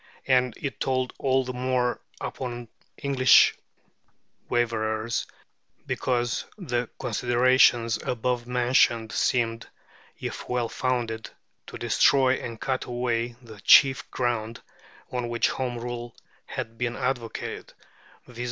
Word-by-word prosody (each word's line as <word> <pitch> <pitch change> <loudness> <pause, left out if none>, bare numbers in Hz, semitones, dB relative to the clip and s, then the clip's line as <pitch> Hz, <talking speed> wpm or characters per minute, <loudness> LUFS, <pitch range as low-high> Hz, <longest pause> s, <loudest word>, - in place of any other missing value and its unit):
And 125 -3 +2
it 140 - -5
told 130 -1 -1
all 130 -1 +2
the 125 - -4
more 125 -1 0 0.2
upon 120 -2 -5 0.3
English 135 -2 +5 1.0
waverers, 115 -1 0 0.6
because 120 -2 -1
the 125 - -2
considerations 120 -1 +3
above 125 0 -2
mentioned 120 -2 +2
seemed, 115 -2 0 0.5
if - - -6
well 125 -2 0
founded, 120 -3 -2 0.4
to - - -8
destroy 130 -2 +4
and 115 -2 -7
cut 130 -1 -2
away 120 -1 -2
the 110 -3 -12
chief 135 +3 +6
ground 115 -2 -2 0.5
on 125 -1 -2
which 120 0 +1
Home 125 -2 -3
Rule 120 0 -6 0.3
had 115 0 -6
been 120 -1 -1
advocated, 125 -3 -4 0.5
viz. 120 -1 -13
120 Hz, 110 wpm, -26 LUFS, 115-125 Hz, 1.0 s, chief